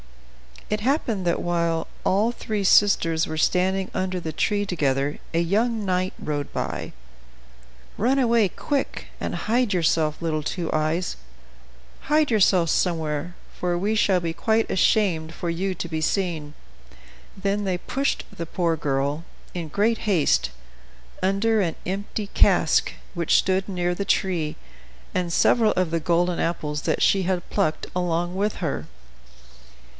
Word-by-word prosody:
It 210 - +1
happened 225 - 0
that 170 - +1
while 170 -1 0 0.2
all 210 +5 +2
three 215 -3 -3
sisters 170 -5 +4
were 155 - -4
standing 190 +3 +1
under 185 -1 -1
the 160 -2 -4
tree 205 +5 0
together 145 -5 0
a 165 - +1
young 215 +5 +1
knight 185 0 0
rode 145 -2 -3
by. - - -4 1.0
"Run 250 +6 +2
away, 235 -5 +4
quick, 280 - -3
and - - -3
hide 235 -1 +1
yourself, 160 -3 +1
little 160 -2 -1
Two 165 +2 -3
Eyes; 155 +4 0 0.9
hide 300 -1 +3
yourself 185 -5 +4
somewhere, 160 -1 -1 0.2
for 175 -1 0
we 200 +5 0
shall 200 -4 +3
be 165 -1 -2
quite 220 +5 +1
ashamed 180 -5 +2
for 170 - -2
you 185 +3 -2
to 170 - -5
be 160 -1 -2
seen." 160 -4 -1 0.8
Then 200 +1 -1
they 185 -2 0
pushed 275 +9 -1
the 170 - -5
poor 170 -1 0
girl, 145 +2 -1 0.3
in 170 -3 -4
great 210 +8 +1
haste, 155 - +3 0.7
under 200 +4 +2
an 170 -4 -1
empty 200 +3 -3
cask, - - +3 0.2
which 170 -3 +1
stood 190 0 +2
near 180 -2 0
the 200 +3 -3
tree, 175 -6 0 0.6
and 180 -2 -1
several 225 -3 +4
of 185 -3 0
the 165 - +1
golden 175 +2 +1
apples 150 -3 -2
that - - +1
she 195 -1 +4
had 180 -1 -1
plucked 155 - 0
along 175 0 -1
with 205 +2 0
her. 135 - -3
180 Hz, 145 wpm, -24 LUFS, 165-205 Hz, 1.0 s, sisters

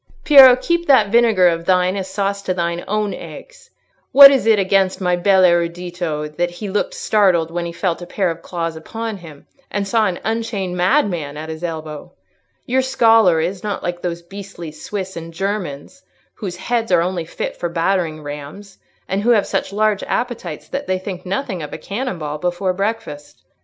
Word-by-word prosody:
"Piero, 270 -4 +9
keep 340 +6 -1
that 225 -8 +4
vinegar 225 -6 +4
of 170 -1 0
thine 185 0 +2
as 190 -1 -4
sauce 200 0 -2
to 185 -2 -2
thine 170 0 -2
own 210 0 -1
eggs! - - -11 0.4
What 275 0 +11
is 265 -4 +1
it 220 -1 +5
against 190 -1 +1
my 180 -2 +1
bel 190 +1 +3
erudito 170 -2 0
that 175 0 +1
he 185 +4 -7
looked 205 - -1
startled 180 -6 +2
when 170 0 -3
he - - -5
felt 170 0 -2
a 175 - -8
pair 185 -1 -1
of 165 0 -8
claws 165 -2 -4
upon 225 +7 -6
him 160 -6 -13 0.2
and 200 0 -2
saw 220 0 +2
an 180 - -3
unchained 220 -5 -2
madman 180 - 0
at 155 +1 -7
his 160 +1 -7
elbow? 155 -3 -6 0.5
Your 260 +2 +1
scholar 225 -9 +4
is 180 +3 -3
not 205 -2 -3
like 175 0 -4
those 170 -1 -4
beastly 190 -3 -9
Swiss 190 +4 -6
and 165 0 -7
Germans, 195 - -4 0.3
whose 190 -5 -6
heads 230 +5 -2
are - - +4
only 175 -2 -3
fit - - -5
for 175 - -3
battering 165 -2 -1
rams, 150 +8 -9 0.3
and 195 +2 -1
who 230 - 0
have 220 -4 +4
such - - -2
large 210 0 +1
appetites 225 - -4
that 275 +1 -4
they 185 - 0
think 185 -1 -7
nothing 190 -2 -3
of 150 - -6
taking - - -8
a - - -19
cannon 235 0 -3
ball 150 -1 -5
before 180 +2 -1
breakfast. 195 -7 -5
185 Hz, 190 wpm, -19 LUFS, 170-210 Hz, 0.5 s, What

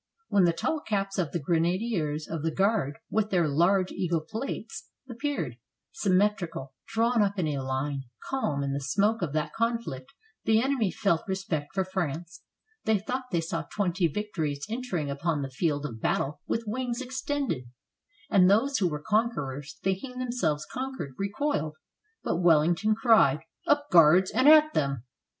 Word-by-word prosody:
When 195 -3 +4
the 170 - +4
tall 300 - -1
caps 195 -6 -2
of 165 -5 0
the - - -1
grenadiers 165 - 0
of 165 -1 -4
the 165 - 0
Guard, 190 -5 +1
with 215 -1 +1
their 175 -5 +2
large 180 +6 +2
eagle 170 -3 -1
plates, 220 - -6 0.2
appeared, 245 - -3 0.3
symmetrical, 185 -8 0
drawn 230 +1 +2
up 200 0 +1
in 180 - +1
line, 135 -1 -2 0.2
calm, 155 - -1
in 140 0 -1
the 140 - -1
smoke 205 +10 +1
of 170 -5 -1
that 155 -1 -1
conflict, 230 - -2 0.3
the 220 0 +4
enemy 255 -4 +1
felt 180 -4 +1
respect 190 -5 -3
for 190 - +2
France; 175 -2 -4 0.4
they 220 -1 +3
thought 255 +6 -3
they 170 -3 +1
saw 165 0 -3
twenty 185 -3 +1
victories 155 -6 -3
entering 215 - -3
upon 145 +1 -1
the 135 - -5
field 145 +1 -1
of 115 -5 -6
battle 145 +2 -1
with 230 - -1
wings 240 +2 -2
extended, 265 - -2 0.6
and 185 -2 +5
those 255 +8 +3
who 185 -3 +2
were 150 -1 -5
conquerors, 150 - -1
thinking 195 +7 -2
themselves 240 -13 -1
conquered, 260 - -5
recoiled; 200 - -1 0.5
but - - 0
Wellington 170 +5 +4
cried 220 - +4 0.3
"Up, 290 0 +2
Guards, 175 +3 +6
and 260 +3 +5
at 310 0 +7
them!" 140 -5 0
185 Hz, 155 wpm, -28 LUFS, 150-225 Hz, 0.6 s, at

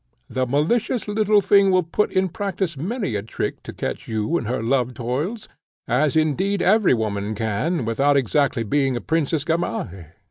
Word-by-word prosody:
The 130 0 -1
malicious 205 - 0
little 210 0 +3
thing 200 0 +5
will 185 -1 +3
put 170 +6 0
in 190 0 +1
practice 190 -3 -3
many 195 - -3
a 105 - -1
trick 110 - -4
to - - -8
catch - - -5
you 110 +8 -1
in 150 - -1
her 120 +1 -2
love 125 0 0
toils, 145 - -3 0.4
as, 140 +5 +1
indeed, 175 +6 +1
every 200 - +4
woman 105 -1 -2
can, 115 - -1
without 140 +5 +2
exactly 135 -1 +1
being 135 +3 +1
a 120 - -3
Princess 160 -2 0
Gamaheh. 95 - -3
145 Hz, 170 wpm, -22 LUFS, 120-190 Hz, 0.4 s, thing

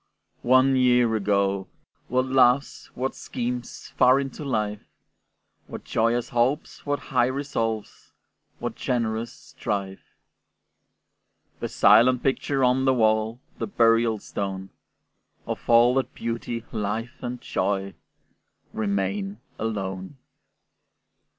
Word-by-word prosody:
One 130 +2 +4
year 125 -3 +3
ago, 100 -2 0 0.4
what 130 +1 +1
loves, 130 +1 +2
what 130 +2 -2
schemes 125 0 -5
Far 130 +2 +6
into 140 +2 -5
life! 105 -6 -2 0.9
What - - -8
joyous 115 +1 0
hopes, 125 +6 0
what 145 0 +1 0.2
high 125 -1 +4
resolves, 120 -5 -3 0.5
What - - -4
generous 115 -1 -2
strife! 95 -2 -6 1.4
The - - -3
silent 125 +1 +5
picture 135 0 0
on 130 +1 +3
the 130 -1 +4
wall, 110 +1 +1 0.2
The - - -2
burial 115 - +3
stone, 95 -1 -5 0.7
Of - - -6
all 120 +1 +6
that 135 0 -1
beauty, 115 0 -4
life, 110 +4 -4
and 125 -1 -4
joy 100 -3 -2 0.8
Remain 100 -1 -2 0.2
alone! 100 +1 -4
115 Hz, 105 wpm, -25 LUFS, 105-130 Hz, 1.4 s, Far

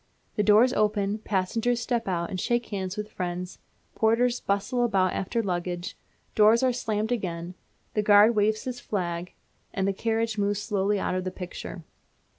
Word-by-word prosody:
The - - +2
doors 215 +5 +5
open, 210 -1 +1
passengers 220 +4 0
step 235 -1 -1
out 170 -2 -1
and 185 - -3
shake 240 +5 0
hands 190 -1 -4
with 210 0 -5
friends, 180 0 -4 0.3
porters 235 +2 +2
bustle 200 +5 0
about 195 -6 +2
after 230 +5 -1
luggage, 175 -2 -3 0.4
doors 220 +3 +5
are 255 -1 +3
slammed 220 -1 -2
again, 180 -6 -3 0.4
the 210 - +1
guard 210 +2 +6
waves 215 +1 +2
his 250 -1 -5
flag, 175 -5 -3 0.4
and 195 0 -1
the 195 - +1
carriages 225 +1 -1
move 205 0 +1
slowly 205 -1 0
out - - -1
of 185 0 -1
the 185 - -2
picture. 180 -1 -7
205 Hz, 165 wpm, -26 LUFS, 185-225 Hz, 0.4 s, guard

